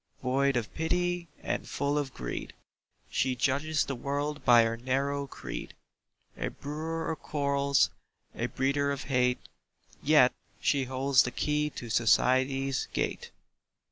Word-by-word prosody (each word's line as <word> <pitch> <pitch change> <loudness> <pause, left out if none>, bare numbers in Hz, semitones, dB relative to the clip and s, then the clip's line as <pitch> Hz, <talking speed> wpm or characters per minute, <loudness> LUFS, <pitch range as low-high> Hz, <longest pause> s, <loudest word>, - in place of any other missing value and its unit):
Void 135 +2 +2
of 115 -3 -3
pity 175 +1 -1 0.2
and - - -3
full 140 +1 -1
of 145 -3 -1
greed, 60 - -5 0.5
She 130 -1 0
judges 140 +4 +1
the 140 - -3
world 145 +2 -3
by 120 -2 +7
her 115 0 0
narrow 140 +3 -1
creed; - - -7 0.6
A - - -3
brewer 160 +3 -4
of 160 - -5
quarrels, 140 -2 +1 0.4
a - - -2
breeder 140 +2 0
of 140 0 -3
hate, 125 -2 +2 0.6
Yet - - +5 0.3
she 135 -2 +1
holds 130 0 +3
the - - 0
key 150 +4 0
to 120 -2 -6
"Society's" 130 +4 +2
Gate. - - -2
140 Hz, 135 wpm, -29 LUFS, 125-145 Hz, 0.6 s, by